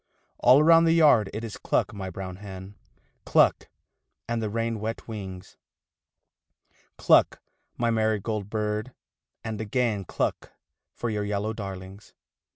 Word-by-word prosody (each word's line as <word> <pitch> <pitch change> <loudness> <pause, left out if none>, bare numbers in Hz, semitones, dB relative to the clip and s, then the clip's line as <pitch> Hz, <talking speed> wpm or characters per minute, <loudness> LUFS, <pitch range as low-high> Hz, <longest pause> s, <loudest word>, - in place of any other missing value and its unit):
All 130 +5 +6
round 165 +1 +6
the 165 - +4
yard 145 -11 +5
it 110 +2 -5
is 110 -3 -6
cluck, - - 0
my 95 -2 -5
brown 95 0 -7
hen, 95 -1 -9 0.5
Cluck, - - +3 0.6
and 115 -1 -2
the 110 - -2
rain 115 +1 -2
wet 110 +2 -5
wings, 95 -4 -8 1.4
Cluck, - - +4 0.4
my 120 -1 +1
marigold 110 -2 -1
bird, 105 +3 -3 0.5
and 110 -2 -4
again 110 -2 -1
Cluck - - -3 0.4
for 120 - -4
your 105 -1 -2
yellow 105 +1 -2
darlings. 95 -1 -9
110 Hz, 130 wpm, -26 LUFS, 100-115 Hz, 1.4 s, All